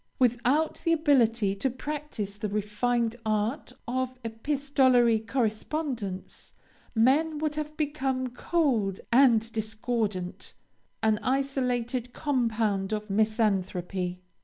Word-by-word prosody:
Without 250 +5 +2
the 330 - +3
ability 240 -10 +3
to 200 +7 -1
practice 260 -6 -5
the 210 0 -4
refined 225 +3 0
art 215 +6 -1 0.2
of 255 +1 -2
epistolary 255 -1 +2
correspondence, 225 -2 -3 0.4
men 290 +7 +3
would 300 0 -1 0.2
become 270 -4 -1
cold 245 - 0
and 235 -3 +5
discordant: 220 -4 -3 0.5
an 215 -1 +3
isolated 250 -2 -1
compound 225 -8 0
of 210 -1 -3
misanthropy. 190 -4 0
235 Hz, 90 wpm, -28 LUFS, 215-270 Hz, 0.5 s, and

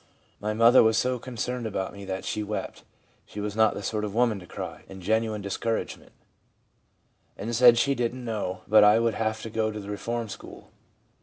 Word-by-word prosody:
My 105 +1 -2
mother 115 +3 +7
was 110 0 +3
so 125 +1 0
concerned 125 0 -4
about 95 -3 -3
me 100 -1 -9
that 95 0 -4
she 105 - -2
wept 105 0 -5 0.4
(she 105 - -10
was 105 0 -3
not 110 -1 +3
the 100 - -6
sort 105 +2 -2
of 105 -1 -4
woman 115 -4 +2
to 90 - -13
"cry") - - -7
in 95 - -9
genuine 110 +2 0
discouragement, 110 +3 -3 1.3
and 115 +4 -3
said 120 0 +7
she 140 +4 +3
didn't 125 0 -3
know 100 -5 -3
but 110 +1 +7
I 105 +1 +7
would 115 -1 +1
have 110 0 -2
to 115 - -6
go 110 0 0
to 105 0 -5
the 100 0 -7
reform 115 +3 -3
school. 100 - -11
110 Hz, 200 wpm, -26 LUFS, 105-115 Hz, 1.3 s, mother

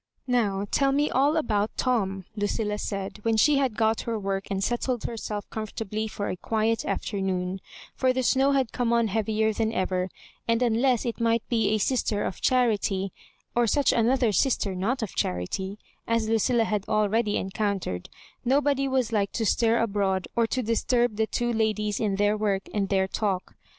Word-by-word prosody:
"Now, 210 -6 +1
tell 275 -1 +3
me 290 +2 +1
all 285 +5 +3
about 215 -8 0
Tom," 195 -7 0
Lucilla 210 0 -1
said, 195 0 -4
when 225 0 +1
she 280 +5 +5
had 260 -6 0
got 220 0 +2
her 230 -1 -2
work 195 -1 -3
and 195 -1 -1
settled 240 +1 -1
herself 210 -3 -4
comfortably 215 0 -4
for 205 -1 -4
a - - -2
quiet 225 +3 0
aflemoon 190 -2 -2 0.2
— - - -18
for 260 -1 +4
the 260 0 -1
snow 270 +2 +3
had 265 -4 +1
come 240 -2 0
on 235 -2 +2
heavier 220 +1 +1
than 220 +1 0
ever, 185 -3 -1 0.4
and 230 +1 +2
unless 240 +1 +2
it 235 0 -3
might 230 0 +1
be 225 -3 +2
a 215 - +2
sister 215 -2 0
of - - -4
charitj, 210 -6 +1 0.4
or 240 -1 +2
such 285 +5 +3
another 240 0 +3
sister 210 -3 +1
not 225 +7 -1
of 210 - -5
charity, 190 - -2 0.3
as 230 -1 +1
Lucilla 225 +2 +2
had 210 -3 -1
already 215 0 +2
en 190 - -3
oountered, 195 - -2 0.4
nobody 275 +1 +2
was 260 -3 0
like 205 -3 +1
to 225 - -1
stir 230 +2 +3
abroad 195 -5 0
or 230 -1 +3
to 255 +2 -1
disturb 235 +1 +1
the 220 +1 +1
two 240 +3 -1
ladies 215 -2 0
in 205 -3 0
their 205 +1 +2
work 205 -2 0
and 200 -2 0
their 190 -1 +2
talk. 195 -2 -2
220 Hz, 180 wpm, -26 LUFS, 200-240 Hz, 0.4 s, she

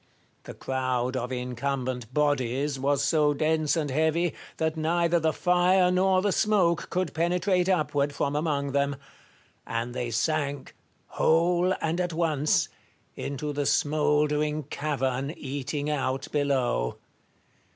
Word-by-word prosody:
The - - -8
crowd 130 -1 -1
of 125 0 -3
incumbent 125 -1 -3
bodies 140 -1 0
was 140 +1 +1
so 150 0 +2
dense 155 +1 +1
and 150 -4 -1
heavy, 160 +4 +1 0.2
that 160 0 0
neither 170 +2 +1
the 160 0 +1
fire 180 +2 +3
nor 185 0 +3
the 205 - +2
smoke 190 -6 +2
could 185 +1 -1
penetrate 180 +3 +1
upward 150 -5 +1
from 140 0 -2
among 145 -2 -1
them; 140 0 +1 0.7
and 115 +1 -3
they 120 -1 -3
sank, 140 +3 -1 0.3
whole 175 +3 +2
and 165 +2 0
at 175 -2 -2
once, 155 -3 +1 0.5
into 145 +2 -4
the 145 0 -1
smouldering 150 0 +1
cavern 140 0 -2
eating 140 +1 -4
out 135 -1 -1
below. 130 - 0
150 Hz, 125 wpm, -27 LUFS, 135-165 Hz, 0.7 s, fire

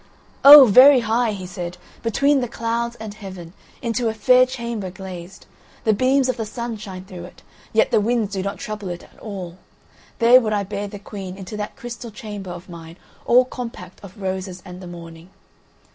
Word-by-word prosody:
"Oh! 285 0 +12
very 255 +4 +7
high," 230 +1 +1
he 190 -2 -7
said, 180 -1 -6 0.2
"between 275 +5 +2
the 245 - -2
clouds 235 +1 -3
and 220 -2 -8
heaven, 190 -5 -10 0.3
into 235 0 0
a 220 - -4
fair 250 +4 +5
chamber 235 -6 -5
glazed. 185 0 -10 0.4
The 220 - +3
beams 260 +4 +2
of 255 - -1
the 225 - -3
sun 235 0 -5
shine 190 -3 -9
through 180 -2 -9
it, 180 - -15 0.3
yet 220 - +2
the - - +3
winds 220 -2 0
do 190 - -2
not 200 +1 -4
trouble 210 0 -6
it 175 0 -6
at - - -20
all. 185 -4 -8 0.6
There 245 +2 +6
would 215 -2 -1
I 205 -1 0
bear 200 +1 -5
the 205 - -8
Queen 195 -2 -8
into 195 +2 -8
that 210 0 -5
crystal 240 0 -8
chamber 205 -3 -8
of 175 +1 -8
mine 165 -1 -11 0.3
all 250 +1 +5
compact 230 -9 -9
of 200 +1 -12
roses 190 -1 -4
and 180 0 -10
the 180 - -9
morning." 170 0 -11
205 Hz, 190 wpm, -21 LUFS, 185-235 Hz, 0.6 s, Oh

